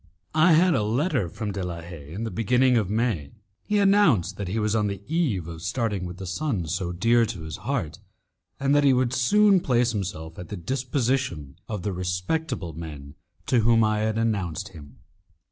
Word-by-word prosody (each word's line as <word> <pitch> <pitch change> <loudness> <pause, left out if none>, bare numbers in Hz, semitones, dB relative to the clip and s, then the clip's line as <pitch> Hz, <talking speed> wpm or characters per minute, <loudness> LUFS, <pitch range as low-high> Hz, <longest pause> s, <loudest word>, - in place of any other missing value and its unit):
I 160 +2 +5
had 175 +2 +5
a - - +2
letter 120 - 0
from 105 +4 -4
De 100 0 -4
la 85 -2 -5
Haye 80 -4 -10
in 100 +7 -5
the 115 - -3
beginning 125 +3 +3
of 110 -5 +1
May. 105 - -1 0.3
He 210 - -1
announced 195 - +4
that 100 - -4
he 95 +5 -2
was 105 0 +1
on 105 -1 +2
the 100 0 -5
eve 140 - 0
of 80 -1 -8
starting 100 +1 -2
with 90 +1 -8
the 95 - -7
son 100 - -2
so 85 +2 -2
dear 115 +7 +3
to 105 -6 -6
his 80 -1 -6
heart, 110 - -3 0.6
and 140 +1 +2
that 145 0 +4
he 140 -2 +5
would 125 -1 +1
soon 200 +10 +4
place 125 -6 +2
himself 90 -6 -5
at 90 - -7
the 105 - -5
disposition 125 - -2
of 105 -5 -4
the 100 - -2
respectable 90 - -2
men 75 -3 -8 0.3
to 125 - +3
whom 115 0 +4
I 110 0 +1
had 110 0 0
announced 100 -8 -1
him. 70 -3 -13
105 Hz, 195 wpm, -25 LUFS, 90-130 Hz, 0.6 s, I